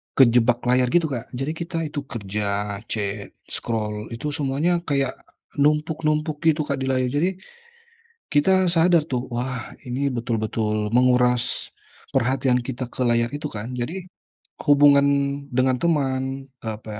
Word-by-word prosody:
kejebak 120 -1 +4
layar 125 0 +4
gitu 160 +3 +2
Kak. 120 -3 -4
Jadi 135 +4 -2
kita 165 +1 -5
itu 150 -1 -4
kerja, 100 -1 -3
cek, 105 -1 -3 0.2
scroll, 105 -1 -3
itu 150 +6 -4
semuanya 145 +5 0
kayak 140 -3 0 0.4
numpuk-numpuk 155 +1 +1
gitu 155 -1 +3
Kak 140 -2 -2
di 135 - -2
layar. 130 -1 +1
Jadi 150 +6 +2 1.0
kita 185 +5 +3
sadar 170 0 +4
tuh, 125 -3 -2
wah 125 -1 -3 0.2
ini 135 +3 -1
betul-betul 110 -3 -1
menguras 125 -1 +2 0.4
perhatian 130 0 +2
kita 130 +1 -4
ke - - -4
layar 120 0 +2
itu 145 +1 -3
kan. 115 +3 -6
Jadi 175 +10 -4 0.6
hubungan 145 -1 +6 0.5
dengan 130 +1 +2
teman, 135 -6 +1 0.4
eee, 110 -1 -2
apa 110 - -13
130 Hz, 135 wpm, -23 LUFS, 120-150 Hz, 1.0 s, hubungan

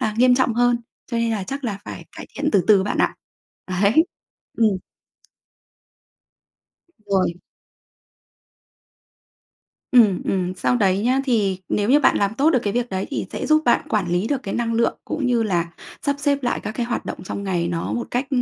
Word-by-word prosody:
là 215 -1 -1
nghiêm 250 0 +6
trọng 250 -2 +1
hơn. 245 0 +3 0.3
Cho 235 - -1
nên 230 0 +1
là 210 -4 -2
chắc 275 +5 -5
là 205 -5 -2
phải - - -8
cải - - -8
thiện - - 0
từ 195 -5 +3
từ 200 -3 +6
bạn 205 - -2
ạ. - - +2 0.7
Ấy, 220 +11 +5 0.5
ừm. 225 -1 +5 2.4
Rồi. 190 -3 +2 2.6
Ừm, 220 -7 +5
ừm. 185 -1 -1
Sau 220 - +1
đấy 195 -4 +2
nhá, 255 +3 +2
thì 205 -7 +1
nếu 205 +1 0
như 290 +3 +6
bạn - - +4
làm 200 +1 +1
tốt 290 +5 +3
được 255 - +3
cái 205 - -1
việc 245 0 -1
đấy 190 0 -2
thì - - -3
sẽ - - -4
giúp 310 0 +4
bạn 240 - +2
quản 205 -5 0
lý 180 +5 0
được 270 -1 -1
cái 195 - -4
năng 230 -1 -1
lượng 230 +1 +1
cũng 295 -4 -2
như 240 -2 +2
là 170 -5 -1 0.3
sắp 285 -1 0
xếp 285 -1 0
lại 245 - 0
các - - -5
cái 235 +2 -2
hoạt 240 - -3
động - - -6
trong 200 - -5
ngày 175 -3 -1
nó 170 -1 -2
một 240 - -3
cách 250 +2 -1
225 Hz, 190 wpm, -22 LUFS, 195-250 Hz, 2.6 s, nghiêm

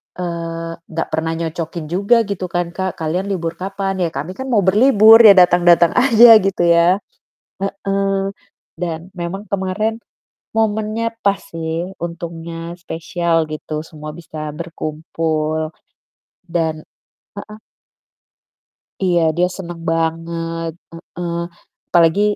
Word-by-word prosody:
eee, 165 -1 -4 0.2
nggak 165 0 -2
pernah 160 0 -1
nyocokin 165 0 -4
juga 205 +6 +3
gitu 195 -3 -4
kan 175 0 -2
Kak, 190 0 -3
"Kalian 165 +4 -1
libur 170 -3 -2
kapan 195 0 -3
ya?" 175 - +1
ya - - -21
kami 160 +6 -4
kan 265 - -5
mau 230 -6 +3
berlibur, 220 +2 +7
ya 205 - +11
datang-datang 175 -2 +5
aja, 235 -3 +8
gitu 195 -2 0
ya. 170 +3 +4 0.6
Heeh, 195 0 -1 0.5
dan, 170 +1 -4
memang 190 +4 -5
kemarin 200 +3 -1 0.5
momennya 220 +1 -1
pas 200 0 +2
sih, 165 +2 -5
untungnya 170 0 -6
spesial 165 -1 -1
gitu, 155 0 -5
semua 155 -1 -9
bisa 155 -2 -7
berkumpul, 155 -1 -3 0.8
dan 160 -2 -1 0.6
heeh? 215 0 -13 1.4
Iya 180 -2 +3 0.2
dia 180 - +3
seneng 175 -2 -7
banget, 165 0 -2 0.2
heeh. 170 +1 -6 0.5
Apalagi, 170 +3 +4
175 Hz, 115 wpm, -18 LUFS, 165-195 Hz, 1.4 s, ya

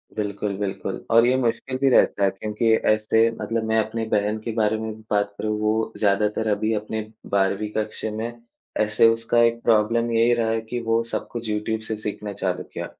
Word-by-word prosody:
बिल्कुल, 105 -1 -2
बिल्कुल। 95 -1 -4
और 115 +1 +6
ये 125 +1 +3
मुश्किल 130 +1 -1
भी 135 +1 +3
रहता 105 -5 +3
है 100 - +5
क्योंकि 105 +3 -1 0.2
ऐसे 110 +1 +3
मतलब 115 0 -1
मैं 110 0 +2
अपनी 115 +1 -4
बहन 105 0 +1
के 115 - -2
बारे 110 -1 +2
में 110 0 -4
भी 110 - -16
बात 100 0 +1
करूँ 110 0 -2
वो 110 +1 0
ज़्यादातर 105 +2 +1
अभी 110 +1 +1
अपने 110 +1 -3 0.3
12वीं 100 +1 +1
कक्षा 110 0 -3
में, 110 +2 -4 0.5
ऐसे 110 +1 +4
उसका 115 +1 +1
एक 115 0 +2
प्रॉब्लम 115 +1 +2
यही 115 +1 +4
रहा 115 -1 +1
है 115 0 0
कि 120 - -2
वो 115 0 +1
सब 115 - -4
कुछ 120 -2 -5
यूट्यूब 105 +1 -2
से 110 - -2
सीखना 105 -1 -5
चालू 95 -2 -2
किया। - - -4
110 Hz, 200 wpm, -23 LUFS, 105-115 Hz, 0.5 s, और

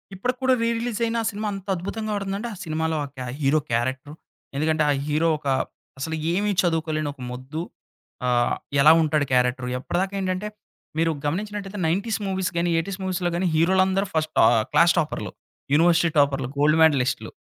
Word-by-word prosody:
ఇప్పటికి 245 +6 -2
కూడా 260 0 +4
re 230 - +2
release 235 -1 -3
అయిన 230 0 -1
ఆ - - -4
సినిమా 210 +1 -4
అంత 195 0 -8
అద్భుతంగా 215 +5 -4
ఆడిందంటే. 200 +3 -3
ఆ - - -8
సినిమాలో 160 0 -1
ఆ - - -8
క 125 -1 -5
హీరో 145 +3 +3
క్యారెక్టర్. 130 +5 -2 0.4
ఎందుకంటే 155 +1 +1
ఆ - - +4 0.2
హీరో 155 +3 +1
ఒక 145 - -8 0.5
అసలు 160 +3 -3 0.2
ఏమి 205 +2 +1
చదువుకోలేని 160 -3 -1
ఒక 130 - -15
మొద్దు. 130 +6 -6 0.7
ఆహ్, 120 -1 +2 0.3
ఎలా 155 +2 +8
ఉంటాడు 155 -2 +1
క్యారెక్టర్? 125 0 +1
ఎప్పటిదాకా 190 +8 -2
ఏంటంటే 185 +2 -2 0.5
మీరు 165 0 +2
గమనించినట్టయితే 205 +4 -3
90స్ 205 +7 0
మూవీస్ 190 -1 -1
గాని, 170 +1 +1
80స్ 190 +4 -3
మూవీస్‌లో 185 -1 -1
గాని, 185 0 0
హీరోలందరూ 190 +3 +3
ఫస్ట్ 155 0 -1
ఆహ్, 115 -1 +5
క్లాస్ 170 0 +5
టాపర్లు. 105 - -3 0.4
University 170 +2 +4
టాపర్లు 140 -3 +2
gold 150 +2 +4
మేడ్‌లిస్ట్లు. 140 -6 +2
165 Hz, 165 wpm, -24 LUFS, 145-195 Hz, 0.7 s, ఎలా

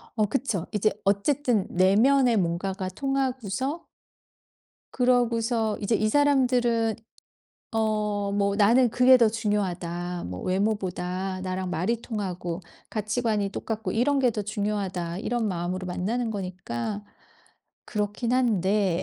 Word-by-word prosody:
어 215 -2 +3
그쵸. 215 -6 -1
이제 210 +1 +2
어쨌든 220 +2 +2
내면의 230 +8 +4
뭔가가 185 +2 -1
통하고서 265 - -2 1.1
그러고서 235 -3 +1
이제 210 +2 +1
이 215 +1 +1
사람들은 245 -5 +2 0.8
어 215 -1 +1 0.2
뭐 200 0 +1
'나는 235 +5 +5
그게 255 +3 +6
더 235 -3 +5
중요하다.' 180 -5 -2
뭐 90 +1 -6
'외모보다 185 -1 -1
나랑 185 0 -3
말이 185 +8 -1
통하고 185 -6 -4 0.3
가치관이 215 -1 -1
똑같고 220 +2 -4
이런 275 +5 +2
게 255 -2 +3
더 210 -2 -3
중요하다.' 195 -4 -2
이런 230 +1 -1
마음으로 180 0 -3
만나는 220 +7 -2
거니까 185 - -4 0.8
그렇긴 210 +2 -2
한데 205 -7 +2
210 Hz, 265 characters per minute, -26 LUFS, 185-240 Hz, 1.1 s, 그게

